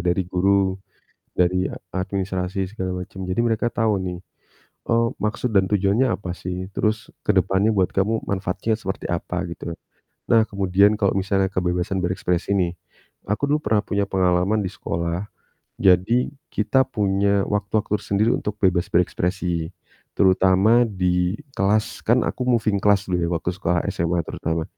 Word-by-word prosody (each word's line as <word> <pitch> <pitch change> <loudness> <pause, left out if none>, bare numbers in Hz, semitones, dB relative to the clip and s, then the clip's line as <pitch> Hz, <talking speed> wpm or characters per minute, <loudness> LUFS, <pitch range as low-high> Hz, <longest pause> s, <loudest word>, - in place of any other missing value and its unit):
dari 90 +2 +1
guru, 95 +1 +1 0.6
dari 90 +1 +2
ad - - -8 0.2
administrasi 95 0 -3 0.2
segala 95 -3 -3
macem. 95 +1 -8
Jadi 90 +4 -2
mereka 115 +1 0
tahu 110 -2 +1
nih, 90 -1 -4 0.7
eee, 115 0 +3 0.2
maksud 110 +2 -1
dan 95 -1 +3
tujuannya 105 +6 +2
apa 90 -5 -3
sih, 90 +1 -5
terus 110 +3 -1
kedepannya 95 +1 +2
buat 95 -4 +1
kamu 110 +3 0
manfaatnya 100 +3 -1
seperti 95 -3 -5
apa, 90 +1 -3
gitu. 85 0 -6 0.6
Nah 115 - +6
kemudian 100 +1 +3
kalau 100 -2 +2
misalnya 95 0 +1
kebebasan 90 +1 -1
berekspresi 90 +1 -1
nih. 90 -2 +1 0.5
Aku 110 +8 -1
dulu 150 - +3
pernah 105 -1 +2
punya 100 -2 -1
pengalaman 95 +3 +1
di 95 - -2
sekolah, 85 +3 -3 0.6
jadi 95 +7 +4 0.2
kita 130 +5 +2
punya 100 0 +1
waktu-waktu 105 +1 0
sendiri 105 +3 +1
untuk 105 0 -4
bebas 90 -2 +2
berekspresi 90 -1 0 0.4
terutama 95 +5 +4
di 90 -3 0 0.2
kelas, 105 +2 0
kan 120 +3 +4
aku 125 - -3
moving 115 -4 +2
class 100 -1 +3
dulu 90 - +1
ya - - 0
waktu 85 0 -2
sekolah 90 -2 0
SMA 85 +1 0
terutama. 80 0 -2
95 Hz, 145 wpm, -22 LUFS, 90-105 Hz, 0.7 s, Nah